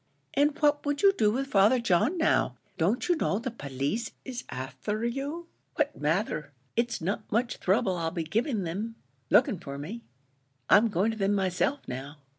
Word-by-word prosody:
"And 290 +1 +2
what 290 -1 +3
would 290 +2 -1
you 395 0 +7
do 215 - +3
with 265 +5 -1
Father 215 0 +4
John, 230 - +2
now? 320 - +2 0.2
Don't 195 +10 +1
you 355 - +4
know 200 - 0
the 245 +3 -3
police 145 - -3 0.2
is 250 -2 -5
afther 210 - -4
you?" 280 +8 -3 0.3
"What 300 -1 0
matther? 150 -2 -1 0.2
it's 235 -4 0
not 190 +5 -3
much 235 +3 0
throuble 190 -1 +2
I'll 165 -1 -1
be 165 0 -3
giving 220 - 0
thim, 205 +7 -4 0.3
looking 205 -2 +4
for 140 -3 -7
me. 190 +12 -6 0.7
I'm 210 +4 +7
going 205 +1 +1
to 220 - -6
thim 200 0 +2
myself 195 +9 0
now." 135 +4 -6
215 Hz, 175 wpm, -28 LUFS, 175-260 Hz, 0.7 s, you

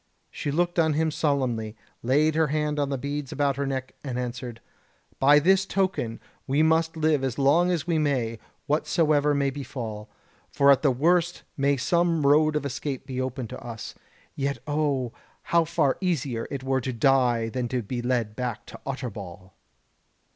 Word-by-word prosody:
She - - -4
looked 175 +4 0
on 160 -2 +3
him 160 +1 +1
solemnly, 125 -8 -1 0.3
laid 150 +6 +3
her 160 0 +2
hand 150 0 -1
on 140 -1 0
the 135 - -1
beads 140 +1 -4
about 140 -1 +1
her 140 0 -1
neck, 130 -1 -4
and 130 -4 -4
answered: 125 -1 -5 0.6
"By 145 +2 +6
this 190 +5 +4
token 190 - -1 0.3
we 140 +3 +3
must 160 +1 +2
live 155 -3 +2
as 130 -2 -2
long 145 +6 +4
as 170 -5 0
we 170 -2 +1
may, 125 -7 0 0.3
whatsoever 150 0 +2
may 140 -1 +1
befall; 120 -6 -6 0.4
for 140 0 +5
at 135 - +4
the 145 - +4
worst 170 +6 +1
may 140 -1 +2
some 170 +2 +1
road 150 +2 +4
of 150 -2 -1
escape 140 0 -4
be 130 -1 -3
opened 130 -2 -4
to - - -8
us. 115 -2 -7 0.4
Yet 140 0 -1
O, 145 -5 -1 0.3
how 170 -1 +2
far 140 -3 +1
easier 140 -10 -1
it 135 -2 -5
were 130 0 0
to 130 - -3
die 120 -2 +2
than 125 +1 -2
to 125 0 -2
be 120 +4 -4
led 120 -4 -1
back 125 -3 -4
to - - -11
Utterbol!" 100 -8 -6
140 Hz, 175 wpm, -26 LUFS, 125-155 Hz, 0.6 s, By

